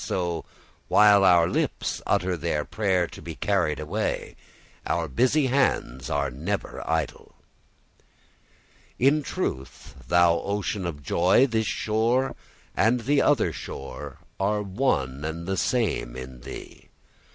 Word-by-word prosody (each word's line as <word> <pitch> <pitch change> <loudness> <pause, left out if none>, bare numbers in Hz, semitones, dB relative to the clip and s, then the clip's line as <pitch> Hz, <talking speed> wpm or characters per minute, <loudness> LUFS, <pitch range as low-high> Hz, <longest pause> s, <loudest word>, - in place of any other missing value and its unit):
So, 85 -3 -2 0.4
while 105 -1 +6
our 90 -3 +6
lips - - -1
utter 90 +1 +1
their 80 -2 -2
prayer 95 -5 +1
to - - -11
be 80 -2 -7
carried 95 -6 0
away, 75 0 -3 0.5
our 85 -1 0
busy 130 - +2
hands 125 - 0
are 70 -2 0
never 70 +7 -4
idle. 80 -1 -2 1.6
In 140 +4 +3
truth, 70 - -5
thou 85 +1 +4
ocean 100 -2 -2
of 75 -4 -6
joy, 90 - +4
this 110 -4 0
shore 115 +5 0 0.4
and 120 +3 +3
the 140 +4 +2
other 145 -6 +2
shore 70 - -7 0.2
are 105 +2 +1
one 85 - -1
and 80 +2 -4
the 95 +1 -1
same 100 - 0
in 65 0 -8
thee. - - -10
90 Hz, 125 wpm, -25 LUFS, 80-110 Hz, 1.6 s, while